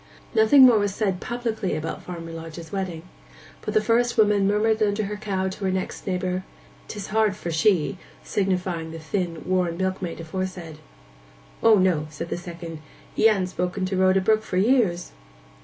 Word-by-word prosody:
Nothing 225 +5 +7
more 235 -4 +6
was 205 -1 -1
said 195 -5 0
publicly 230 -5 -2
about 160 +1 -4
Farmer 165 -2 -7
Lodge's 165 0 -8
wedding, 185 -5 -4 0.6
but - - -4
the 215 - +5
first 235 +2 +1
woman 205 -2 +4
murmured 215 +2 +2
under 210 0 +1
her 210 +1 -4
cow 195 -3 -2
to 190 +1 -5
her - - +2
next 185 +1 -4
neighbour, 185 0 -1 0.4
''Tis 205 -2 -6
hard 215 -2 +3
for 170 - -5
she,' 180 +2 +2 0.2
signifying 180 -4 -1
the 165 - -7
thin 165 0 -3
worn 180 -2 0
milkmaid 185 -2 -2
aforesaid. 170 -1 -5 0.8
'O 225 -1 +6
no,' 180 -5 +2
said 160 +2 -7
the - - -2
second. 170 -2 -8 0.3
'He 225 - +4
ha'n't 195 -4 +1
spoke 180 -1 -3
to 190 +1 -2
Rhoda 190 +1 +4
Brook 215 +3 +3
for 185 - -4
years. 200 -5 +2
190 Hz, 170 wpm, -24 LUFS, 175-210 Hz, 0.8 s, Nothing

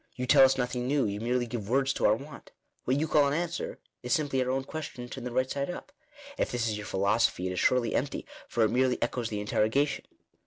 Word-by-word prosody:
You 125 0 -3
tell 135 +1 +7
us 130 0 +5
nothing 125 -1 -1
new; 140 -1 +2
you 100 0 -3
merely 120 +1 0
give 110 -3 -5
words 135 +2 +2
to - - +2
our 105 - +4
want. 140 +4 -11 0.4
What 130 +2 +2
you 160 - 0
call 150 -2 +4
an 140 - 0
answer, 170 +1 -3 0.2
is 125 -1 -1
simply 140 -4 +1
our 125 - -3
own 130 +1 0
question 135 -4 -6
turned 120 - -6
the - - -5
right 130 +2 +1
side 140 +3 -3
up. 180 +10 -7 0.5
If - - +1
this 120 -1 0
is 110 - -1
your 105 0 -6
philosophy 100 0 +1
it 95 - -1
is 90 - -2
surely 120 -3 +2
empty, 140 +2 -2 0.2
for 115 - +1
it 110 - +2
merely 125 +1 +2
echoes 120 -1 -1
the 105 - -3
interrogation." 110 +7 +1
125 Hz, 240 wpm, -29 LUFS, 115-140 Hz, 0.5 s, tell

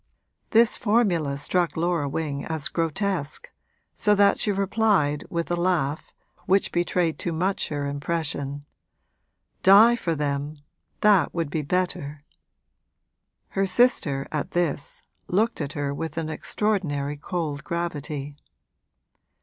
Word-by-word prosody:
This 230 +1 +4
formula 195 - +1
struck 165 +2 0
Laura 165 -3 0
Wing 145 -1 -3
as 160 +1 -2
grotesque, 165 -1 -2 0.4
so 210 -1 +3
that 200 0 +4
she 210 - +2
replied 195 -7 +1
with 170 0 -3
a - - +2
laugh 170 -5 -1 0.4
which 195 +1 +3
betrayed 175 -1 0
too 175 - -2
much 185 +4 -1
her 145 -1 -2
impression, 145 -1 -3 1.0
'Die 210 +5 +7
for 170 -8 -2
them 145 0 -2 0.4
that 205 -5 +4
would 165 -4 -2
be 160 - -1
better!' 150 -3 -2 1.3
Her 195 0 0
sister, 180 - +2
at 150 -2 -3
this, 165 -5 -2 0.2
looked 215 +2 +1
at 145 -1 -4
her 145 -1 -2
with 160 +3 -5
an 160 -1 -2
extraordinary 155 -5 -1
cold 150 -1 -4
gravity. 150 -4 -4
165 Hz, 120 wpm, -25 LUFS, 145-190 Hz, 1.3 s, Die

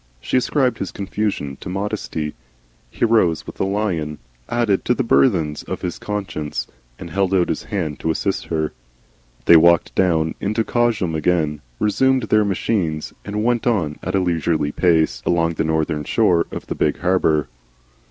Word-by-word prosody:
She - - -3
ascribed 130 0 +1
his 95 - -3
confusion 95 -8 -3
to - - -8
modesty. 95 -6 -3 0.6
He 120 - 0
rose 100 -9 +2
with - - -10
a - - +2
lion 95 -7 -1 0.3
added 115 -5 +1
to 125 - +2
the 130 - 0
burthens 85 - +2
of - - -6
his 90 - -3
conscience, 100 -8 -4 0.3
and 85 - -9
held 95 +1 +1
out 90 -2 +2
his - - -2
hand 85 -8 -3
to - - -2
assist 95 +4 -1
her. 80 -2 -2 0.7
They 85 - +8
walked 85 +1 +4
down 80 -4 +2
into 105 +3 0
Cosham 110 -8 0
again, 80 -2 0 0.2
resumed 130 - +2
their 110 0 +3
machines, 90 -5 -1
and 105 +1 -3
went 120 0 +1
on 85 -11 0
at 95 +2 -2
a - - +3
leisurely 85 -4 0
pace 80 -1 +2
along 85 -1 +2
the - - -1
northern 80 -1 0
shore 90 -1 +2
of - - -7
the - - -3
big 75 - 0
harbour. 85 -5 +2
90 Hz, 165 wpm, -20 LUFS, 80-105 Hz, 0.7 s, They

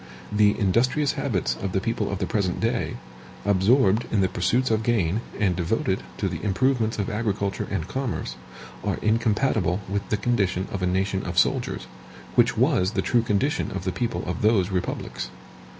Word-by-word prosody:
The 105 0 +4
industrious 125 +9 +2
habits 90 - -1
of 95 -2 -3
the 95 - +2
people 115 0 -1
of 100 - -2
the 95 - -1
present 95 -2 -1
day, 115 +1 -1 0.5
absorbed 105 +3 +3
in 105 - +2
the 95 - +3
pursuits 110 +9 +1
of 110 -1 +2
gain, 110 -4 +1 0.2
and 95 -4 +2
devoted 95 +2 0 0.2
to 100 - 0
the 90 -3 -5
improvements 115 +2 +1
of 100 - -1
agriculture 105 -3 -1
and 90 -4 -2
commerce, 130 +3 -3 0.5
are - - -1
incompatible 110 -3 +2
with 100 +1 -3
the 105 - +1
condition 100 -5 0
of 100 - -3
a 90 - +1
nation 95 +1 0
of - - -5
soldiers, - - +1 0.5
which - - +3
was 95 +3 +2
the - - 0
true 120 - +3
condition 115 - 0
of - - -4
the 95 - -1
people 115 +6 -2
of - - -3
those 105 -3 +3
republics. 90 -8 -3
105 Hz, 175 wpm, -25 LUFS, 95-115 Hz, 0.5 s, The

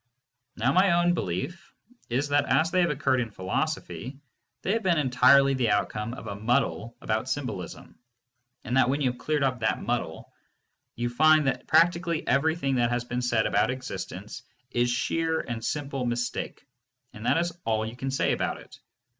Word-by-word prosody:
Now 125 +5 +1
my 185 -1 +4
own 175 0 +3
belief 150 - -4 0.3
is 135 +5 0
that 145 0 +2
as 165 +2 +2
they 185 - +3
have 175 - +2
occurred 135 -3 +1
in 115 - -3
philosophy, 125 +6 -3 0.5
they 190 - 0
have 225 - 0
been 180 -5 +2
entirely 135 0 +5
the 125 -4 +1
outcome 105 +3 -1
of - - -10
a 105 - -4
muddle 115 +1 -1
about 110 +3 -1
symbolism, 125 -10 -5 0.6
and 125 - -1
that 130 - +4
when 140 +3 0
you 130 -3 +2
have 125 - -13
cleared 150 +1 0
up 130 -2 0
that 110 -1 0
muddle, - - -3 0.6
you 120 +1 -1
find 155 +5 +4
that 125 -2 -1
practically 170 0 +2
everything 140 0 +1
that 120 -1 +2
has 120 0 -1
been 125 0 -3
said 120 -3 +1
about 105 +3 +2
existence 130 +1 -6 0.3
is 120 0 +1
sheer 160 +6 0
and 115 -2 -5
simple 140 -2 -2
mistake, 120 0 -3 0.5
and 105 +2 -6
that - - +3
is 170 0 0
all 110 -1 0
you 110 +2 -6
can 135 +2 -4
say 135 - +1
about - - -1
it. - - -15
130 Hz, 180 wpm, -27 LUFS, 120-155 Hz, 0.6 s, entirely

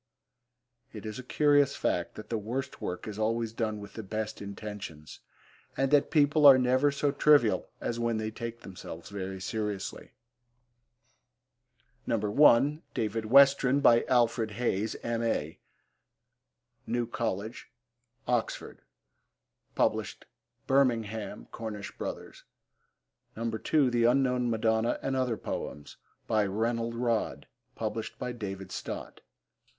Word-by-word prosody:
It 110 -1 -8
is 110 +2 -5
a - - -7
curious 145 +1 +3
fact 85 -1 -1
that 110 - -10
the 115 - +1
worst 120 +6 -4
work 90 +4 -4
is 105 0 -6
always 115 +1 0
done 110 -2 -2
with 100 0 -10
the 110 - -6
best 110 +1 -4
intentions, 100 -6 -8 0.6
and 135 0 +1
that 145 -1 +4
people 150 -1 +5
are 135 -2 +10
never 130 +3 +3
so 140 0 0
trivial 145 -5 +4
as 120 - -3
when 115 -1 0
they 110 0 -3
take 115 +1 -6
themselves 90 -1 -9
very 95 -1 -5
seriously. 105 -1 -4 1.9
(1) 130 +6 +4
David 110 0 -1
Westren. 140 +2 +6
By 120 -4 +5
Alfred 120 -3 +2
Hayes, 110 -3 -1
M.A. 115 -9 -1 1.3
New 120 0 0
Coll., 110 -3 -2 0.8
Oxon. 120 -2 -2 1.9
(Birmingham: 115 -6 0
Cornish 110 -3 -6
Brothers.) - - -7 0.9
(2) 115 +5 +1
The 120 -1 +2
Unknown 125 -1 +2
Madonna 110 0 +1
and 135 - -1
Other 125 -4 0
Poems. 75 - -6 0.3
By 105 -2 +2
Rennell 115 +3 -1
Rodd. 115 -2 -1 0.9
(David 95 -2 -6
Stott.) - - -6
115 Hz, 110 wpm, -29 LUFS, 105-125 Hz, 1.9 s, are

